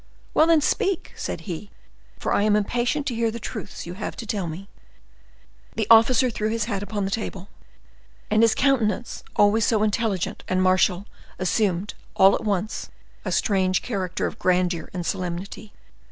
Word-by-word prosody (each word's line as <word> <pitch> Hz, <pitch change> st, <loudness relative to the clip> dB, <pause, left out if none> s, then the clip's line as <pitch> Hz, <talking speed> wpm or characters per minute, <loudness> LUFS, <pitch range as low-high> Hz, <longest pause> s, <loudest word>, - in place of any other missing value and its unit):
"Well, 315 Hz, -, +5 dB
then, 330 Hz, -2 st, +5 dB
speak," 390 Hz, +3 st, 0 dB
said -, -, -4 dB
he, 190 Hz, +1 st, -6 dB, 0.5 s
"for -, -, -1 dB
I -, -, +3 dB
am 210 Hz, 0 st, +3 dB
impatient 240 Hz, +7 st, 0 dB
to 260 Hz, -, -2 dB
hear 230 Hz, 0 st, +1 dB
the 230 Hz, +1 st, -5 dB
truths 210 Hz, -, -7 dB
you 175 Hz, -, -6 dB
have 190 Hz, -, -5 dB
to 230 Hz, -, -7 dB
tell 205 Hz, -4 st, -2 dB
me." 170 Hz, +5 st, -7 dB, 1.1 s
The 220 Hz, -, 0 dB
officer 240 Hz, +2 st, +6 dB
threw 215 Hz, -1 st, -2 dB
his 225 Hz, -1 st, -1 dB
hat 205 Hz, -4 st, -3 dB
upon 205 Hz, -1 st, -3 dB
a 195 Hz, -, -3 dB
table, 195 Hz, -3 st, -4 dB, 0.8 s
and 215 Hz, +1 st, +4 dB
his 230 Hz, -1 st, +4 dB
countenance, 245 Hz, -4 st, 0 dB
always 210 Hz, +2 st, +4 dB
so 215 Hz, 0 st, +2 dB
intelligent 215 Hz, -3 st, -1 dB
and 185 Hz, -, +1 dB
martial, 185 Hz, 0 st, +3 dB, 0.3 s
assumed, 190 Hz, 0 st, 0 dB, 0.2 s
all 190 Hz, +1 st, +6 dB
at -, -, -1 dB
once, 210 Hz, 0 st, -2 dB, 0.3 s
a -, -, -3 dB
strange 190 Hz, -3 st, +1 dB
character 190 Hz, -6 st, -2 dB
of -, -, -5 dB
grandeur 180 Hz, -3 st, +1 dB
and 175 Hz, -2 st, -4 dB
solemnity. 185 Hz, +3 st, -4 dB
205 Hz, 170 wpm, -24 LUFS, 185-225 Hz, 1.1 s, officer